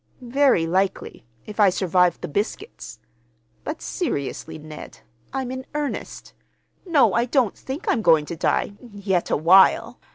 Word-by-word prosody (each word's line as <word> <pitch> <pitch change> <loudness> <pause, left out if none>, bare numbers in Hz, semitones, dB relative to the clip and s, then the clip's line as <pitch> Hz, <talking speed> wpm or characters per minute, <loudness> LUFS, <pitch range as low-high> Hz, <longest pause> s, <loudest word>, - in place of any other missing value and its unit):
"Very 275 -12 +4
likely—if 185 - -4
I 205 -2 +6
survive 180 -2 +1
the - - -4
biscuits. 210 - -5 0.7
But, 305 +1 -6
seriously, 160 - -4
Ned, 155 0 -11 0.3
I'm 265 -1 -3
in 260 0 -5
earnest. 295 -1 -5 0.5
No, 315 -6 +4
I 235 - +2
don't 250 -4 +1
think 270 +5 -7
I'm 230 - +1
going 160 -6 +4
to 170 - -6
die—yet 200 +1 -2
awhile. 180 +6 +4
200 Hz, 125 wpm, -23 LUFS, 165-260 Hz, 0.7 s, I